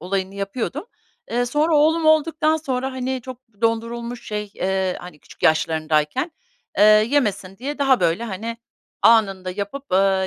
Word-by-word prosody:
olayını 190 +1 -3
yapıyordum. 235 - -4 0.4
Eee, 245 +1 0
sonra 300 +5 +2
oğlum 315 +2 +3
olduktan 315 0 +3
sonra, 265 -3 -3
hani, 260 0 -3
çok 255 -1 -8 0.2
dondurulmuş 235 +1 -2
şey, 210 -1 -4
eee, 190 -1 -1
hani, 180 -4 -11
küçük - - -17
yaşlarındayken, 155 - +1 0.5
eee, 205 - +7
yemesin 215 -3 +3
diye 285 +5 -5
daha, 270 -3 +3
böyle, 175 +6 +1
hani, 225 +2 -5 0.5
anında 195 -5 +4
yapıp, 205 +5 -6
ııı 190 0 +3
230 Hz, 140 wpm, -22 LUFS, 190-265 Hz, 0.5 s, eee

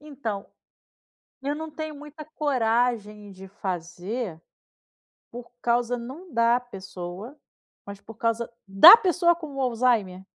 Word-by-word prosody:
Então, 260 -9 -6 1.0
eu 285 +2 -2
não 315 +1 -7
tenho 310 0 -6
muita 300 +1 -11
coragem 235 -8 -1
de 190 0 -12
fazer 180 +1 -5 0.9
por 235 0 -10
causa, 240 0 +1
não 290 +9 -10
da 235 +1 +3
pessoa, 195 +2 -9 0.5
mas 200 0 -9
por 225 - -13
causa 230 +1 -2 0.2
da 195 - +10
pessoa 350 -4 +2
com 310 -4 -10
o 275 - -4
Alzheimer. 230 -7 0
235 Hz, 120 wpm, -25 LUFS, 200-285 Hz, 1.0 s, da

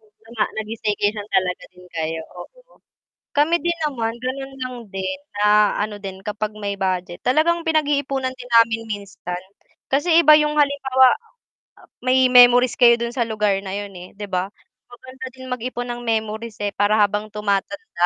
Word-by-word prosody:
Yun 215 -1 -29
na 225 - -17
nga 220 - +1
nag-staycation 210 -1 -2
talaga 180 -1 0
din 180 0 -16
kayo 160 0 -2 0.2
oo - - -14 0.6
kami 315 +4 +4
din 345 0 0
naman 230 -6 -2
ganun 270 +1 -4
lang 255 -1 -5
din 195 +9 -4 0.2
na 210 0 +4
ano 210 0 -4
din 190 -1 -7
kapag 210 0 -3
may 200 -1 -3
budget 185 -2 -2
talagang 330 +6 +2
pinag-iipunan 285 -4 0
din 245 0 -11
namin 225 0 -3
minsan 195 -3 -6 0.5
kasi 325 +5 +3
iba 305 -2 +8
yung 300 0 +2
halimbawa, 265 -3 +4 0.6
ah, - - -18
ah, - - -35
may 255 +1 +3
memories 245 0 +7
kayo 235 -1 +7
dun 235 0 -4
sa 250 - -2
lugar 210 -2 +1
na 195 - -8
yun, 200 -1 -5
eh, 180 +2 -12
di 205 - -5
ba 185 +1 -1 0.4
maganda 260 +2 -10
din 260 0 -11
mag-ipon 250 0 -4
ng 240 0 -5
memories, 220 0 -2
eh, 205 - 0
para 205 +1 +2
habang 210 +1 +1
tumatanda 210 - -1
230 Hz, 170 wpm, -21 LUFS, 205-260 Hz, 0.6 s, iba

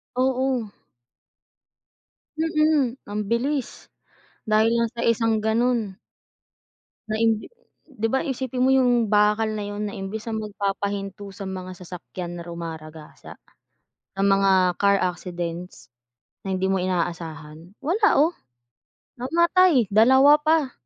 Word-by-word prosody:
Oo. 255 -2 0 1.7
Mhm, 305 -5 +1 0.2
ambilis, 235 +7 -1 0.8
dahil 215 +1 +4
lang 235 -1 +1
sa 235 - -4
isang 225 -1 +2
ganun. 235 +3 +1 1.3
Na 215 - -1
imbi 225 -1 +1 0.4
'di 225 -5 -3
ba, 265 - +2
isipin 260 -3 -3
mo 255 - +4
yung 245 -4 +3
bakal 210 +1 +2
na 210 - -4
'yun, 205 +1 -4
na - - -8
imbis 205 +3 -6
na 220 - -2
magpapahinto 200 -1 -4
sa 195 -1 -7
mga 185 -1 -6
sasakyan 175 0 -8
na 170 - -7
rumaragasa, 160 -2 -9 0.9
ng 195 - +3
mga 195 0 +4 0.2
car 200 0 +3
accidents, 175 -1 -4 0.5
na 190 -1 -3
hindi 185 - -2
mo 190 - +1
inaasahan, 170 -1 -4
wala 410 +7 +3
oh, 310 +5 +4 0.9
namatay 330 - +3
dalawa 265 +7 +6
pa. 310 -3 +2
215 Hz, 115 wpm, -24 LUFS, 190-255 Hz, 1.7 s, dalawa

